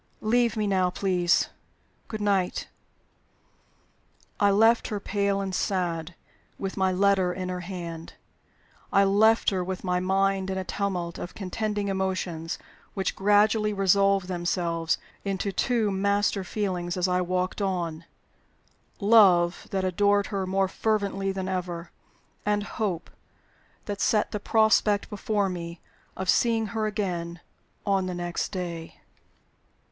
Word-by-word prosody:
Leave 235 +1 +2
me 215 - +1
now, 190 -2 +2
please. 180 -2 +1 0.6
Good 215 -2 -5
night." 195 -3 0 1.7
I 205 - +5
left 225 +4 +4
her, 210 - -3
pale 200 -1 0
and 190 -1 -3
sad, 175 -3 -1 0.4
with 195 -1 -4
my 190 -1 +2
letter 190 -1 +3
in 185 0 -4
her 180 0 -3
hand. 170 -2 -7 0.8
I 200 - +5
left 215 +4 +4
her, 185 -2 -1
with 185 0 -5
my 180 -1 +1
mind 195 +1 +1
in 190 - -2
a 190 - -2
tumult 180 -3 -3
of 175 - -7
contending 205 +1 -2
emotions, 185 -4 -2 0.4
which 190 -2 -1
gradually 210 +2 +3
resolved 195 -1 +3
themselves 175 -2 -1 0.3
into 195 0 -2
two 225 +1 +1
master 200 0 +1
feelings 180 -3 -2
as 180 0 +1
I 180 0 +1
walked 185 +2 -1
on: 170 -4 -2 0.9
Love, 195 -5 +5
that 190 -1 -1
adored 200 +2 +2
her 195 -1 -1
more 190 +1 +1
fervently 200 -1 -1
than 190 -1 -4
ever; 175 -2 -4 0.5
and 205 0 +1
Hope, 205 -6 -3 0.7
that 205 -1 -4
set 210 -2 +2
the 210 - -2
prospect 220 -1 +3
before 205 0 0
me 170 -2 -5 0.4
of 190 - -4
seeing 225 +2 +3
her 220 -1 0
again 175 -5 -3 0.5
on 195 -2 +1
the 180 - -3
next 175 -1 -3
day. 170 -4 -5
190 Hz, 130 wpm, -26 LUFS, 180-205 Hz, 1.7 s, I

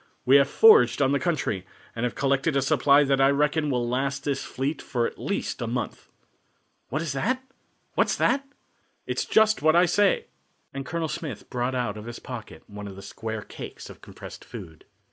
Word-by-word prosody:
We 135 +2 +7
have 140 0 +3
foraged 445 -1 +6
on 135 -1 +3
the 140 - +2
country, 150 - -1 0.3
and 115 +1 -1
have 120 - -3
collected 140 +2 +1
a 135 - +2
supply 140 +2 +4
that 135 -1 +2
I 135 - +6
reckon 150 +2 +1
will 125 -3 0
last 135 +3 -1
this 140 -2 -1
fleet 140 +3 -3
for 120 -2 -1
at - - -5
least - - -3
a - - -2
month." - - -4 0.8
"What's 155 +1 -2
that? 255 - -1 0.5
What's - - +2
that?" 275 +1 +2 0.6
"It's - - -2
just 220 0 +3
what 155 +2 +4
I 175 +1 +6
say," 200 +3 +2 0.5
and 135 0 -5
Colonel 165 -1 -2
Smith 145 -9 -6
brought 125 +1 -1
out 120 -4 -2
of 105 - -8
his 120 0 -7
pocket 125 -3 -9
one 105 0 -8
of 100 - -9
the 95 - -10
square 110 +2 -5
cakes - - -9
of - - -15
compressed - - -11
food. 80 -2 -11
135 Hz, 190 wpm, -26 LUFS, 120-155 Hz, 0.8 s, We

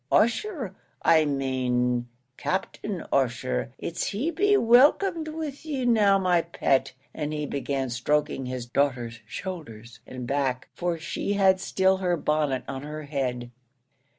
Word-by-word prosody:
Ussher, 240 - +1 0.3
I 160 -1 +5
main 125 -3 0 0.3
Captain 190 +2 -3
Ussher 120 - 0
it's 170 - -3
he'd 275 +12 -1
be 410 +5 +4
welcome 290 - +5
with 310 -3 -5
you 280 -5 -2
now, 210 -5 +5
my 180 -3 +3
pet," 165 -5 0 0.2
and 150 -1 -3
he 150 -1 -2
began 135 -2 -2
stroking 135 +1 0
his 125 -1 -4
daughter's 120 -3 -1
shoulders 120 - -7
and 130 -1 -6
back, 135 -1 -1
for 175 -1 -1
she 175 +5 -3
had 190 -2 +4
still 190 0 +2
her 180 -2 0
bonnet 150 -4 0
on 135 - -5
her 150 +1 -6
head. 125 -4 -3
150 Hz, 135 wpm, -26 LUFS, 130-200 Hz, 0.3 s, I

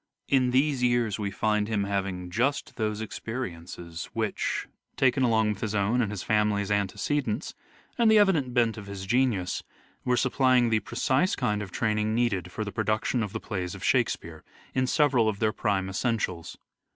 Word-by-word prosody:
In 130 -2 +3
these 135 +1 +2
years 120 -4 +1
we 100 -1 -1
find 105 +1 0
him 105 -3 0
having 95 -3 -3
just 130 +8 0
those 110 -2 -2
experiences 85 -8 -6
which, - - -2 0.3
taken 135 0 +3
along 110 -3 +3
with 105 -1 -3
his 110 -1 -2
own 105 +5 +2
and 110 - 0
his 105 -3 -5
family's 105 -1 +1
antecedents, 110 - -1 0.5
and 230 -2 +5
the 220 - +6
evident 175 -11 +3
bent 120 -3 +2
of 100 - -10
his 100 -1 -6
genius, 115 -5 +1 0.4
were 125 0 +1
supplying 130 -2 +3
the 110 - +3
precise 135 - +1
kind 105 -5 0
of 100 - -6
training 110 0 0
needed 100 -7 0
for 110 - -3
the 105 - -5
production 110 +4 0
of 105 -3 -3
the - - -4
plays 90 -3 -4
of - - -10
Shakespeare, 80 -1 0 0.3
in 130 0 +1
several 130 -6 +3
of 105 - -3
their 110 0 +1
prime 100 -3 0
essentials. 95 -4 -2
110 Hz, 175 wpm, -27 LUFS, 100-125 Hz, 0.5 s, the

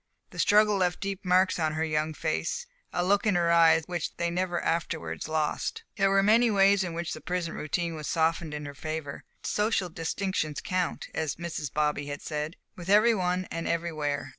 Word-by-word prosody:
The - - -10
struggle 210 0 +4
left 180 -2 +1
deep 195 -1 -4
marks 185 0 +3
on 155 -1 +1
her 160 +1 -1
young 155 0 -1
face, 165 - -2 0.3
a 175 - 0
look 200 +3 +2
in 205 - +3
her 170 -1 +2
eyes 165 -1 +6
which 175 -2 -4
they 170 0 0
never 175 0 -1
afterwards 85 - -2
lost. 160 - -1
There 195 -3 +3
were 195 0 +4
many 230 +4 +5
ways 200 -1 +4
in 170 -2 -4
which 170 0 -3
the 155 - -8
prison 175 +1 -2
routine 170 +2 -2
was 155 -2 -6
softened 160 -1 0
in 150 0 -5
her 145 - -7
favor. 155 0 -5 0.2
Social 210 -3 0
distinctions 165 -2 -2
count, 185 -2 -2
as 155 -3 -2
Mrs. 165 -4 -5
Bobby 150 -1 0
had 145 0 -6
said, 150 +2 -3 0.2
with 175 0 -8
every 215 +3 +6
one 185 -2 0
and 165 0 -3
everywhere. 155 -4 -2
170 Hz, 190 wpm, -28 LUFS, 155-190 Hz, 0.3 s, eyes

